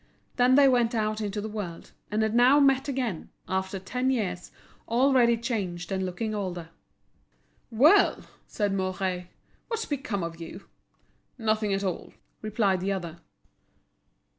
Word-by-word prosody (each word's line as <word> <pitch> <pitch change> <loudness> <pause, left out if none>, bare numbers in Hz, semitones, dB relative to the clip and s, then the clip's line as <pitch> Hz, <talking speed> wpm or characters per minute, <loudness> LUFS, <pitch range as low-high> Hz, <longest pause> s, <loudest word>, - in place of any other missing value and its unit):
Then 250 0 +5
they 280 0 +7
went 240 -3 +2
out 215 0 -1
into 205 0 -3
the 215 - -4
world, 205 -6 -6 0.2
and 215 +1 0
had 220 0 0
now 250 +4 +6
met 270 -1 +3
again, 250 - -3 0.2
after 190 +1 -2
ten 250 +8 -2
years, 190 -9 -2 0.4
already 240 -1 +4
changed 200 -7 -3
and 190 0 -1
looking 200 +4 -3
older. 180 -5 -4 1.0
"Well," 280 - +5 0.2
said 205 -2 -1
Mouret, 185 -1 -2 0.4
"what's 455 -1 -2
become 250 - -3
of 165 0 -6
you?" 165 - -9 0.7
"Nothing 215 -3 0
at 195 0 0
all," 185 -3 -4 0.3
replied 210 -3 +1
the 195 +2 -1
other. 170 -3 -4
215 Hz, 140 wpm, -27 LUFS, 190-245 Hz, 1.0 s, they